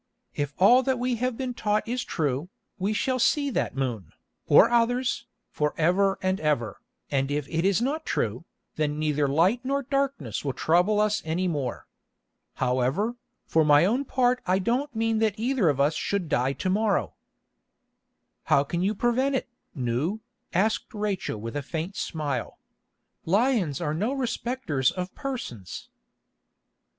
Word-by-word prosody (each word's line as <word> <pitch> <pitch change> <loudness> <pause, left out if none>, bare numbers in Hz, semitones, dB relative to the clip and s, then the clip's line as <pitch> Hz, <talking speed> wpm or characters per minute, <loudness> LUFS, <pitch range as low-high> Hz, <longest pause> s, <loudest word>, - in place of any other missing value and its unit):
If 145 -1 -3
all 240 +7 +6
that 260 0 0
we 245 0 -1
have 250 0 -1
been 255 -2 -3
taught 210 -2 0
is 245 +2 -1
true, 150 0 -2 0.3
we 195 +3 0
shall 255 +4 0
see 285 +3 +2
that - - -1
moon, 115 - -3 0.4
or - - +7
others, 240 +1 +1 0.2
for 150 0 -1
ever 195 +4 +2
and 185 +1 +1
ever, 120 -9 -1 0.3
and 135 -1 +1
if 145 -1 -2
it 165 0 -1
is 195 +3 +2
not 300 +5 -1
true, 115 - -2 0.3
then 150 -1 0
neither 150 -2 +1
light 175 - +2
nor 275 +2 -1
darkness 275 - -2
will 135 -3 -1
trouble 180 +6 +3
us 210 0 +2
any 170 +4 -1
more. 140 -8 -3 0.7
However, 130 - 0 0.3
for 160 - +3
my 150 +2 +6
own 240 +8 +1
part 250 -2 +1
I 185 +1 +3
don't 245 +7 -1
mean 225 0 +1
that 220 -3 +1
either 235 - +2
of 140 -2 0
us 145 +3 +3
should 200 0 -2
die 130 -2 +1
to 185 - -3
morrow." 200 - +1 1.3
"How 140 - +4
can 170 +4 -3
you 200 +4 +1
prevent 255 +5 +1
it, 255 - -2 0.3
Nou?" 130 - -1 0.3
asked 215 +4 0
Rachel 205 - -2
with 115 +4 -6
a 145 - -1
faint 165 +6 -5
smile. 145 -7 -3 0.7
"Lions 200 - +2
are 150 -4 -1
no 210 - -1
respecters 240 - -1
of 180 0 -5
persons." 125 - -6
185 Hz, 155 wpm, -26 LUFS, 145-240 Hz, 1.3 s, or